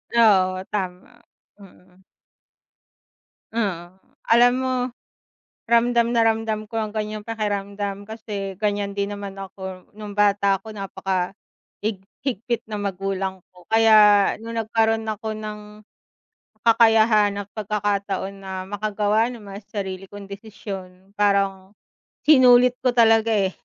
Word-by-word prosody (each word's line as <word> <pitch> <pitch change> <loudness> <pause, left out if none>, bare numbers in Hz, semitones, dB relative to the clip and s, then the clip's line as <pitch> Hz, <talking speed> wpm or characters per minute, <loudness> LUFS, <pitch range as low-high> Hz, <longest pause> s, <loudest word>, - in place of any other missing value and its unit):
Oo 190 -5 +4
tama, 195 +4 -5 0.4
mm. 185 -1 -18 1.5
Mm, 185 -6 -3 0.3
alam 240 +2 +6
mo, 260 0 -1 1.0
ramdam 235 0 +3
na 230 -1 +3
ramdam 220 -1 0
ko 220 - -27
ang 215 - -3
gan'yang 215 0 -4
pakiramdam 205 -2 -4
kasi, 205 -4 -6
gan'yan 205 -1 -2
din 200 +1 -1
naman 200 -1 -7
ako 190 -1 -8
nung 210 -1 -9
bata 200 -1 +3
ako 215 +3 -11
napaka 195 -1 -3 0.5
hig 205 -4 -2 0.2
higpit 235 -1 -2
ng 210 -2 -5
magulang 195 -1 -3
ko. 180 +1 -20
Kaya 225 0 +5 0.5
nung 230 0 -6
nagkaroon 225 0 +1
ako 215 0 -4
ng, 215 -1 -6 1.0
kakayahan 220 -2 +5
ng 200 0 -6
pagkakataon 200 -2 -2
na 190 0 -6
makagawa 210 +1 0
naman 205 -4 -9
sa 205 0 -5
sarili 190 0 -5
kong 200 0 -11
desisyon, 195 -2 -9
parang 195 -1 +1 0.5
sinulit 250 -4 +6
ko 250 -1 0
talaga, 225 -1 +5
eh. 200 -4 +2
205 Hz, 120 wpm, -23 LUFS, 195-225 Hz, 1.5 s, alam